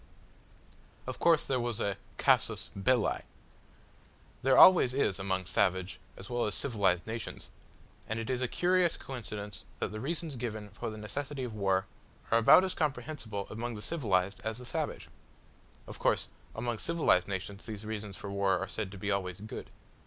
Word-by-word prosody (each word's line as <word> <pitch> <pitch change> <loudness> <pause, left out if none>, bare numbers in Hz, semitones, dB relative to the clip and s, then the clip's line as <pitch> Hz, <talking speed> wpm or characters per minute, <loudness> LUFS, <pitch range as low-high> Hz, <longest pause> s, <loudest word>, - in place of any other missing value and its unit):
Of - - -5
course 165 -3 +5
there 130 -2 0
was 120 -2 -2
a 100 -1 0 0.2
casus - - +2
belli. 115 +3 +2 1.2
There 135 +1 +4
always 150 -9 +8
is 100 -8 +1
among 95 -1 -1
savage 95 0 +1 0.2
as 95 - -9
well 120 -2 0
as 105 - -1
civilised 100 -9 +1
nations, 115 0 -6 0.6
and 110 - -1
it 115 - -4
is 130 -1 -1
a 125 - +1
curious 180 +3 +2
coincidence 105 -6 -6
that - - -2
the 110 - -5
reasons 155 +2 -3
given 110 -3 -4
for 100 +2 -5
the 110 - -7
necessity 135 +5 -4
for 120 - -6
war 95 -2 +1 0.5
are 115 - +6
about 115 +10 +8
as 190 - -1
comprehensible 125 - -3
among 115 +2 -4
the 105 - -7
civilised 100 - 0
as 110 +1 -3
the 125 - -9
savage. - - -3 0.8
Of - - -9
course - - +1 0.3
among 115 0 -2
civilised 160 - +3
nations 100 +2 -5
these 110 -1 -6
reasons 105 -3 -5
for 100 - -6
war 100 -1 +2
are 95 +2 -3
said 105 -3 -4
to - - -8
be 100 +2 -2
always 95 -2 -2
good. 110 +2 -7
110 Hz, 170 wpm, -31 LUFS, 100-125 Hz, 1.2 s, always